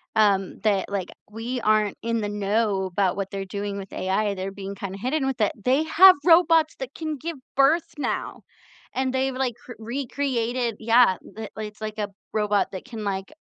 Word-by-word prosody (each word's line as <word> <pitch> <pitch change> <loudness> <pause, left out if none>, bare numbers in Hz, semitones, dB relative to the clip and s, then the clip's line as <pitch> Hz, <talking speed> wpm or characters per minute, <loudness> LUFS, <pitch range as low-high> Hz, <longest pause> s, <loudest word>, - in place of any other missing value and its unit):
um, 200 -3 +2
that, 205 -3 +1
like, 200 -3 -3 0.2
we 235 +4 -4
aren't 215 -2 +2
in 230 -1 0
the 205 - -2
know 205 -1 0
about 185 0 0
what 195 -1 -4
they're 195 -1 -4
doing 200 +1 -4
with 195 -1 -9
AI, 195 +2 0
they're 190 +1 -4
being 195 0 -7
kinda 195 0 -6
hidden 265 +6 0
with 265 -3 -2
it" 210 - +3
they 265 +5 +3
have 370 +4 +8
robots 330 -2 +5
that 265 0 -6
can 310 -2 -4
give 330 +2 -5 0.2
birth 300 +5 +3
now, 295 - -3 0.5
and 260 0 0
they've, 265 0 0
like, 255 -3 -1
cr 245 - -8
recreated 240 -1 -2
yeah, 230 -2 +5
the 220 - -10
li 220 - -4
it's, 210 +1 -15
like, 215 0 -5
a 205 -1 -2 0.2
robot 210 -2 +1
that 190 - -7
can, 230 -4 -7
like, 195 +1 -3
220 Hz, 190 wpm, -24 LUFS, 200-265 Hz, 0.5 s, have